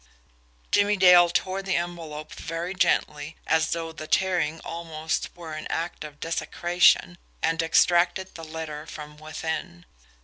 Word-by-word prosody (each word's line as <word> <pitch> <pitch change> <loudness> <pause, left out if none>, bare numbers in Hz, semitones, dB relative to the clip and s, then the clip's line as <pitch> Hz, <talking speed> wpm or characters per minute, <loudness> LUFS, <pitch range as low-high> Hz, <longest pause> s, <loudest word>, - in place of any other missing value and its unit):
Jimmie 205 0 +3
Dale 180 -2 +7
tore 185 +2 -1
the 190 -1 -1
envelope 165 -3 -4
very 170 +3 -4
gently, 150 -4 0
as 160 0 +2
though 165 -1 -2
the 155 -1 -8
tearing 175 -4 +1
almost 160 -1 -3
were 165 -3 -8
an 155 0 -5
act 170 -1 -3
of 150 -1 -10
desecration 175 +1 +2 0.2
and 165 0 +2
extracted 175 +3 +3
the 165 - -9
letter 160 -1 -6
from 150 -1 -9
within. 155 - -5
165 Hz, 135 wpm, -26 LUFS, 155-175 Hz, 0.2 s, Dale